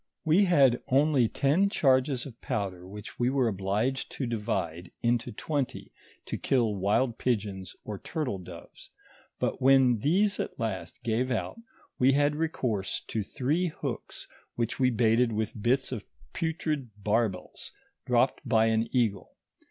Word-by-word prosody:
We 170 +6 +5
had 135 -9 +4
only 135 -3 +3
ten 155 +8 +2
charges 130 -5 +2
of 120 -4 -11
powder 90 -3 -3
which 105 +1 -10
we 120 +1 +2
were 130 -2 +2
obliged 105 +6 -1
to 135 - -3
divide 105 -7 -3
into 120 0 +1
twenty 140 +4 -3 0.3
to - - -4
kill 120 -5 +2
wild 105 +5 +1
pigeons, 100 -6 -2
or 105 -2 -6
turtle 135 -12 -3
doves; 90 -2 -12 0.5
but - - -2
when 130 -3 +5
these 195 - +2
at - - -4
last 110 0 -4
gave 120 +2 0
out 130 - -2 0.4
we 130 +2 +5
had 145 +1 +2
recourse 125 - -1
to 110 - -1
three 150 - 0
hooks, 160 - -6 0.3
vhich 120 +2 -2
we 130 -1 +4
baited 115 0 +3
with 110 0 -3
bits 130 +4 +1
of 115 -6 -4 0.3
putrid 155 -5 -2
barbels 105 -3 -1 0.4
dropped - - +2
by 110 0 +3
an 115 0 +2
eagle. 110 -7 0
120 Hz, 145 wpm, -28 LUFS, 105-135 Hz, 0.5 s, We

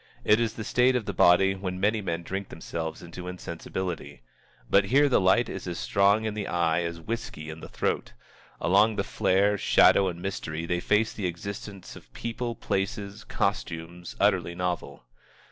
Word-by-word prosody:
It 105 +1 +5
is 115 -2 0
the 110 - -5
state 125 +4 +3
of 120 -4 0
the 100 - -3
body 95 +2 +5
when 95 -1 -4
many 105 +3 +2
men 85 -3 -3
drink 95 +2 -4
themselves 80 0 -5
into 90 +1 -8
insensibility. 90 -5 -5 0.4
But 100 0 +4
here 140 +8 +4
the 125 - +3
light 95 +6 +4
is 95 - -6
as 85 -1 -3
strong 100 +2 +3
in 110 - -1
the 105 -1 -4
eye 85 -1 +1
as 85 -1 -4
whiskey 85 -6 -5
in 80 - -9
the - - -10
throat. - - -2 0.5
Along 105 +4 +4
with - - -1
the - - -14
flare, 100 +2 +2
shadow, 95 - +5
and 85 -2 -4
mystery, 85 -4 -4
they 85 +1 0
face 105 +4 +1
the 100 -4 -2
existence 100 +2 -7
of - - -15
people, 115 0 -4
places, 100 +1 -3
costumes, 85 -3 -3
utterly 95 -4 +2
novel. 85 -7 -3
95 Hz, 180 wpm, -27 LUFS, 85-105 Hz, 0.5 s, It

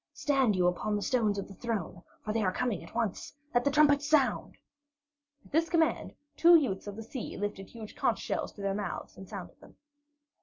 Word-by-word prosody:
Stand 270 -7 +2
you 180 -1 +2
upon 180 +4 0
the 205 - -2
steps 220 -6 +1
of 200 - -4
the 195 - -11
throne, 195 -6 -4 0.2
for 215 - -2
they 225 - +1
are 185 -3 +2
coming 235 -3 -2
at - - -14
once. 230 +1 -2 0.2
Let 245 0 +3
the 285 - +3
trumpets 290 0 +4
sound!" 300 -4 +2 0.9
At - - -19
this 325 +2 +2
command, 325 -2 +1 0.2
two 340 +1 +7
youths 210 - +1
of 205 - -5
the 225 - -7
sea 235 +2 -6
lifted 205 -1 -4
huge 220 -2 -10
conch - - +1
shells - - -3
to 205 - -10
their 195 0 0
mouths 200 -3 -5
and 190 -1 -11
sounded 195 -4 -8
them. - - -16
220 Hz, 205 wpm, -30 LUFS, 200-275 Hz, 0.9 s, two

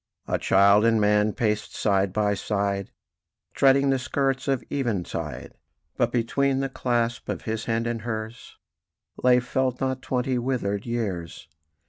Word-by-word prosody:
A - - 0
child 100 +2 +5
and 115 -1 +3
man 105 0 +3
paced 105 -1 -2
side 100 -2 +1
by 105 +1 +1
side, 100 -1 -2 0.6
Treading 135 0 +4
the 135 - +1
skirts 135 +1 -1
of 135 -2 0
eventide; 95 - -3 0.4
But - - +1
between 135 +3 +1
the 135 0 -1
clasp 120 -3 -1
of - - -3
his 110 0 -3
hand 115 0 0
and 115 -1 -2
hers 110 0 -6 0.6
Lay, 125 -1 +5
felt 125 +1 -1
not, 130 -1 -1
twenty 125 0 -1
withered 120 -5 -2
years. 95 -10 -4
115 Hz, 140 wpm, -25 LUFS, 105-130 Hz, 0.6 s, child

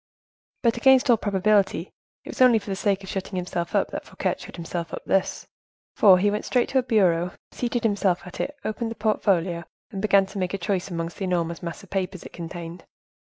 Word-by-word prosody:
But, 235 -1 +3
against 260 0 +5
all 235 - +5
probability, 200 -3 +1 0.3
it - - -10
was - - -5
only 250 -3 +7
for 205 -1 -5
the - - -1
sake 195 0 0
of 190 - -9
shutting 195 0 -4
himself 175 -1 -3
up - - +1
that - - -5
Fouquet - - -2
shut - - -10
himself 170 0 -5
up - - -6
thus, 195 -1 0 0.5
for 190 -3 +7
he 205 +3 +2
went 210 - -2
straight 245 -2 +1
to 265 - +3
a - - +3
bureau, 180 -7 +2 0.2
seated 240 -1 -2
himself 200 -5 +1
at 180 - -10
it, 290 +1 -3
opened 225 +2 -2
the 225 - -6
portfolio, 180 -6 +1 0.3
and 195 - -4
began 200 -2 +4
to 195 +1 -7
make 185 +1 -1
a - - -2
choice 190 0 -2
amongst 165 -1 -4
the 195 - -3
enormous 170 -2 -1
mass 170 +3 -6
of 195 - -17
papers 190 -2 -2
it - - -11
contained. 170 0 -7
195 Hz, 215 wpm, -25 LUFS, 175-215 Hz, 0.5 s, only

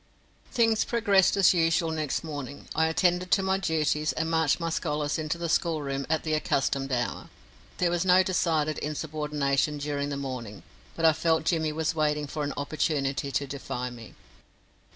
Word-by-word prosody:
Things 225 -2 +3
progressed 200 -5 +3
as 195 -2 +6
usual 165 -1 +2
next 155 -2 -2
morning. 145 -3 -7
I 160 +1 +2
attended 180 +2 +1
to 195 - +3
my 190 0 +1
duties 155 -3 0
and 160 +1 -2
marched 160 -2 +2
my 165 -1 -2
scholars 150 -2 -1
into 155 +2 -2
the 170 0 -3
schoolroom 150 -5 -1
at 160 0 +1
the 155 - -1
accustomed 135 -2 0
hour. 120 -1 -2 0.5
There 175 -1 +1
was 175 0 +1
no 185 0 +5
decided 160 -5 0
insubordination 150 -1 -1
during 145 0 -2
the 140 - -3
morning, 125 -7 -6 0.3
but 165 - 0
I 160 - +7
felt 160 0 +1
Jimmy 160 -2 +1
was 160 +2 -1
waiting 150 -1 0
for 150 +1 -4
an 145 -1 -2
opportunity 140 -2 -1
to 140 - 0
defy 125 -2 -5
me. 115 -2 -12
155 Hz, 170 wpm, -27 LUFS, 145-165 Hz, 0.5 s, I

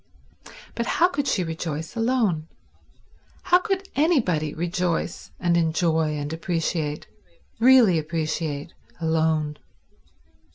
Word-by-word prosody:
But 235 0 -3
how 350 +2 +5
could 285 -5 -2
she 185 - +1
rejoice 160 +1 -5
alone? 225 -9 +1 1.0
How 360 - +5
could 390 -1 -2
anybody 225 - +2
rejoice 175 +1 -2
and 175 -1 +2
enjoy 160 -2 +1
and 145 +1 -4
appreciate, 165 -3 -2 0.5
really 235 -8 +6
appreciate, 155 -1 -3 0.3
alone? 160 -2 0
165 Hz, 95 wpm, -24 LUFS, 155-230 Hz, 1.0 s, really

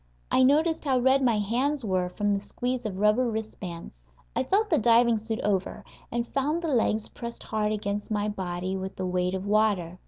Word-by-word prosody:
I - - +4
noticed 310 +5 +3
how 265 -2 +2
red 265 +2 +4
my 240 -4 +3
hands 250 +6 0
were 185 -2 0
from 205 +2 0
the 200 - 0
squeeze 245 +3 -3
of 190 -3 -6
rubber 210 +5 +3
wrist 220 -1 -5
bands. 165 - -8 0.3
I - - +2
felt 420 +2 +1
the 315 - +4
diving 235 0 +4
suit 220 +1 -4
over, 200 0 -1 0.3
and 235 0 -1
found 300 +5 0
the 330 - -1
legs 220 -4 +1
pressed 235 -1 -8
hard 215 -1 -1
against 205 -1 -3
my 210 -1 0
body 185 -2 -3
with 190 0 -5
the 185 - -3
weight 180 0 0
of 190 +1 -4
water. 200 -5 +1
215 Hz, 200 wpm, -27 LUFS, 190-250 Hz, 0.3 s, I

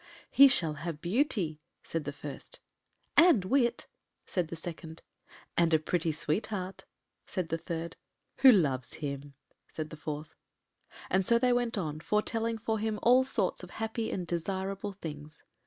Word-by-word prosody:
“He 275 - +9
shall 170 - +3
have 165 -2 -4
beauty,” 180 - 0 0.2
said 165 -3 -3
the 145 - -2
first. 145 -1 -9 0.6
“And 330 - +6
wit,” 240 +3 +2 0.4
said 180 -3 -1
the 165 - -6
second. 165 -1 -8 0.5
“And 170 -1 +4
a - - +6
pretty 165 +1 0
sweetheart,” 185 +5 -2 0.4
said 180 -4 -3
the 165 - 0
third; 165 -1 -5 0.4
“who 265 - +9
loves 140 - +1
him,” 140 -1 -5 0.3
said 155 -1 -6
the 155 - -8
fourth. 150 0 -6 0.8
And 190 +1 +3
so 235 +5 +4
they 250 +1 +3
went 245 -2 0
on, 155 -5 -3
foretelling 225 +5 0
for 220 0 -2
him 215 0 -1
all 250 +2 +6
sorts 215 -7 -1
of 180 - -10
happy 225 0 -2
and 180 - -3
desirable 190 +4 -3
things. 150 -5 -9
180 Hz, 155 wpm, -30 LUFS, 155-220 Hz, 0.8 s, He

